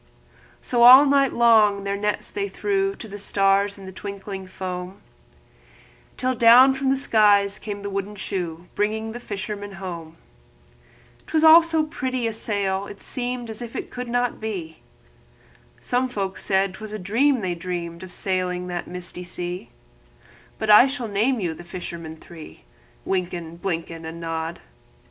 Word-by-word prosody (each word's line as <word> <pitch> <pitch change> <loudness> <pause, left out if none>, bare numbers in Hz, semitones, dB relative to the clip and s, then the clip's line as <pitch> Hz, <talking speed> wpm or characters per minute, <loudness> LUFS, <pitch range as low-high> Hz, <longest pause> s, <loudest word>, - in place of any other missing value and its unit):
All 250 +4 +9
night 275 -1 +3
long 220 -4 +4
their 200 0 -2
nets 210 +1 -2
they 200 -1 -3
threw 390 - 0
For 225 - -9
the 205 0 -7
fish 200 0 +2
in 195 - -11
the 190 - -8
twinkling 195 0 -7
foam, 185 0 -6 1.2
Then 255 -1 -1
down 245 +3 +8
from 270 0 -1
the 270 - +2
sky 210 -6 +4
came 205 -2 -6
the 200 - -3
wooden 200 +1 -4
shoe, 175 -4 -4
Bringing 220 +2 -1
the 240 - -7
fishermen 205 -2 -6
home; 170 -4 -8 1.1
'T - - -12
was 315 0 +3
all 320 +1 +10
so 325 -1 +1
pretty 260 -5 -3
a 225 - -1
sail, 200 -3 -2
it 200 - -11
seemed 245 -1 -3
As 220 - -8
if 235 -1 -8
it - - -5
could 250 0 -6
not 245 0 -1
be; 180 -8 -5 1.0
And - - -21
some 255 +1 +1
folk 195 -5 -3
thought 195 -1 +1
't - - -12
was 215 -1 -7
a - - -3
dream 235 +7 +1
they'd 175 -3 -3
dreamed 170 -1 -5
Of 185 -1 -9
sailing 180 -1 -1
that 175 -1 -4
beautiful 180 0 -5
sea; 175 0 -5 0.9
But 215 - +1
I 210 +5 +9
shall 250 -4 -4
name 225 +5 +1
you 175 -5 -2
the 165 - -11
fishermen 170 -2 -7
three: 160 - -13 0.4
Wynken, 175 -3 -3
Blynken, 165 -2 -4
And 165 +1 -7
Nod. 165 0 -4
200 Hz, 165 wpm, -23 LUFS, 180-235 Hz, 1.2 s, all